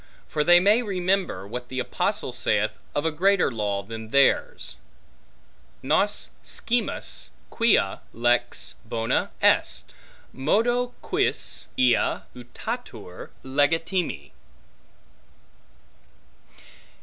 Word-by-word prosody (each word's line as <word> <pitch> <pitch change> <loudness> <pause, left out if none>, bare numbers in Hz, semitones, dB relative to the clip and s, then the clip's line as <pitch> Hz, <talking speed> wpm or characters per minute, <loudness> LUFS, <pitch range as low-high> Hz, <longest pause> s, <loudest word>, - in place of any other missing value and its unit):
For 150 - 0
they 175 +3 +7
may 205 +6 +4
remember, 185 - -1
what 125 +3 -6
the 130 - -6
apostle 130 - -1
saith - - 0 0.2
of 145 - 0
a 160 - +2
greater 190 +2 +3
law 105 -3 -2
than 110 +1 -8
theirs; 140 - +2 1.1
Nos - - +1
scimus 240 0 -2 0.2
quia 220 - +2
lex 120 +1 0
bona 115 0 -1
est, - - +2 0.4
modo 240 - +1
quis - - -1
ea 125 -1 +3
utatur 120 -6 -7
legitime. 145 - 0
140 Hz, 90 wpm, -25 LUFS, 115-190 Hz, 1.1 s, they